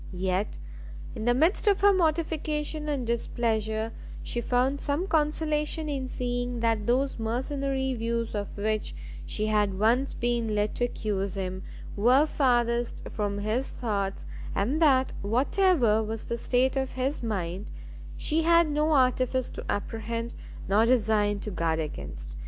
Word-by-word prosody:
Yet, 185 +2 -1 0.6
in 220 - -5
the 240 0 +4
midst 330 - +2
of 400 -2 +4
her 405 0 +6
mortification 310 -3 0
and 275 -4 -1
displeasure, 225 -1 -1 0.3
she 240 - -3
found 255 +4 +1
some 290 +6 -1
consolation 305 -1 0
in 270 -3 -2
seeing 245 -1 -2
that 225 -2 +1
those 260 +1 +1
mercenary 265 +3 -1
views 230 -1 -2
of 205 -1 -4
which 215 - -1 0.3
she 210 - -1
had 210 -3 +1
once 235 +6 +2
been 235 -2 0
led 210 0 0
to 245 - +2
accuse 200 -4 -2
him, 185 -1 -3 0.3
were 250 +8 +5
farthest 240 -5 +1
from 205 -2 -2
his 215 +6 -1
thoughts, 200 -5 -2 0.3
and 255 +11 0
that 265 -4 +4
whatever 245 - +3
was 220 0 -4
the 235 - -2
state 255 +3 +1
of 265 -1 -1
his 265 +3 -1
mind, 195 -3 -3 0.5
she 320 +1 +1
had 335 -1 +4
no 300 +2 +2
artifice 255 -1 +2
to - - -7
apprehend, 230 +3 -3 0.3
nor 215 +4 +4
design 215 -4 +3
to 210 - -5
guard 165 -3 0
against. 70 - -6
240 Hz, 145 wpm, -27 LUFS, 215-275 Hz, 0.6 s, her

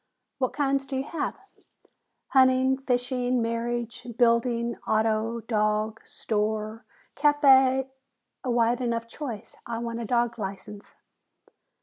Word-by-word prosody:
"What 255 -2 0
kinds 275 -1 0
do 270 - -4
you 265 - -1
have?" 300 +1 -3 0.9
"Hunting, 260 0 +4
fishing, 250 -1 0
marriage, 235 +1 -3
building, 235 0 +2
auto, 220 +1 +1
dog, 215 -1 0
store, 215 +1 -2 0.3
café 270 -3 +5 0.3
" 240 +1 -55
"A 255 - -3
wide 235 +1 +2
enough 230 -1 -1
choice. 230 -5 -7
I 235 -1 -3
want 235 0 -4
a - - -4
dog 235 0 0
license." 200 +1 -7
235 Hz, 115 wpm, -26 LUFS, 225-260 Hz, 0.9 s, café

